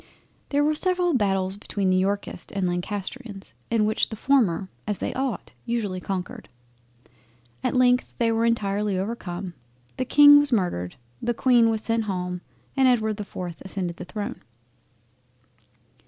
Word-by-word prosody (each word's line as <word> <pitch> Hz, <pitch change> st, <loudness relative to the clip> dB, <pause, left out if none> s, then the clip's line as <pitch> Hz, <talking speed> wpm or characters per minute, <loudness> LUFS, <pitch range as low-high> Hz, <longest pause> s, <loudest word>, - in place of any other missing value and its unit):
There 290 Hz, 0 st, +2 dB
were 305 Hz, +1 st, +3 dB
several 360 Hz, +1 st, +1 dB
Battles 195 Hz, -5 st, +1 dB
between 200 Hz, -2 st, -1 dB
the 185 Hz, -, +3 dB
Yorkists 200 Hz, +2 st, -2 dB
and 195 Hz, -2 st, -1 dB
Lancastrians, 195 Hz, +4 st, -4 dB, 0.2 s
in 225 Hz, -2 st, +2 dB
which 215 Hz, +1 st, +1 dB
the 220 Hz, -, -5 dB
former 215 Hz, -8 st, +2 dB, 0.2 s
(as 210 Hz, -2 st, 0 dB
they -, -, -3 dB
ought) 265 Hz, -2 st, -3 dB
usually 220 Hz, -6 st, -2 dB
conquered. 185 Hz, -1 st, -5 dB, 1.1 s
At -, -, 0 dB
length 250 Hz, 0 st, +3 dB
they 230 Hz, -1 st, +2 dB
were 225 Hz, 0 st, +1 dB
entirely 205 Hz, -3 st, +1 dB
overcome; 190 Hz, -3 st, -4 dB, 0.4 s
The 255 Hz, -, -1 dB
King 290 Hz, +2 st, +8 dB
was 290 Hz, -1 st, +1 dB
murdered—The 125 Hz, -, -2 dB
Queen 240 Hz, -2 st, +4 dB
was 220 Hz, -1 st, 0 dB
sent 230 Hz, -1 st, 0 dB
home—and 180 Hz, +7 st, -2 dB
Edward 220 Hz, -4 st, +2 dB
the 210 Hz, -, -4 dB
4th 180 Hz, -4 st, -6 dB
ascended 185 Hz, -3 st, -4 dB
the -, -, -7 dB
Throne. 205 Hz, +2 st, -5 dB
210 Hz, 140 wpm, -25 LUFS, 185-240 Hz, 1.1 s, King